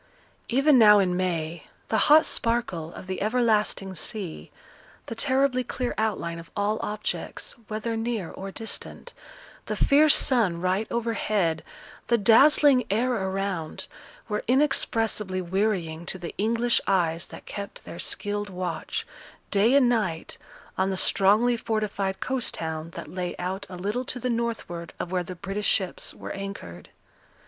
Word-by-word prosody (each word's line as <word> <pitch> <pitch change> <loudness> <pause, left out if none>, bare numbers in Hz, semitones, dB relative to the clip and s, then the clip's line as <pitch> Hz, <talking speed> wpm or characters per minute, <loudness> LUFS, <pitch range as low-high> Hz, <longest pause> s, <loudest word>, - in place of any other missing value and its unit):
Even 275 +2 +5
now 210 -2 +8
in 185 -3 +2
May, 170 -3 -2 0.2
the 220 - +2
hot 310 +1 +8
sparkle 230 -9 0
of - - -9
the 185 0 -4
everlasting 215 -3 +1
sea, 185 -1 -3 0.6
the - - -5
terribly 260 +1 +2
clear 250 0 -3
outline 170 -6 -2
of 165 - -12
all 210 +2 0
objects, 210 0 -4 0.2
whether 220 +1 -3
near 225 -5 -2
or 195 +1 -7
distant, 225 - -7 0.5
the - - -2
fierce 295 +1 +5
sun 220 -11 +3
right 185 +4 0
overhead, 215 -8 0 0.4
the 235 - +4
dazzling 260 +4 +6
air 240 +6 +1
around, 190 -5 -2 0.4
were 210 -1 -2
inexpressibly 225 -7 +1
wearying 175 -3 -1
to - - -3
the 175 -2 -7
English 230 +3 +1
eyes 170 -4 +1
that - - -11
kept 200 -1 -7
their 170 - -8
skilled 205 0 -2
watch, 185 -1 -4 0.5
day 215 +6 +4
and 275 -3 +6
night, 210 -9 -1 0.4
on 190 +1 +2
the 190 - -2
strongly 210 +7 +4
fortified 210 -4 -2
coast 260 -2 -1
town 160 0 -4
that - - -7
lay 180 -1 -4
out 190 +3 -4
a 180 - -7
little 205 +7 -2
to 250 - -5
the 250 +1 -1
northward 225 -8 -3
of 175 - -4
where 185 -1 +1
the 180 +1 -7
British 195 +3 -3
ships 190 -4 -1
were - - -8
anchored. 195 - -7
205 Hz, 145 wpm, -26 LUFS, 185-235 Hz, 0.6 s, now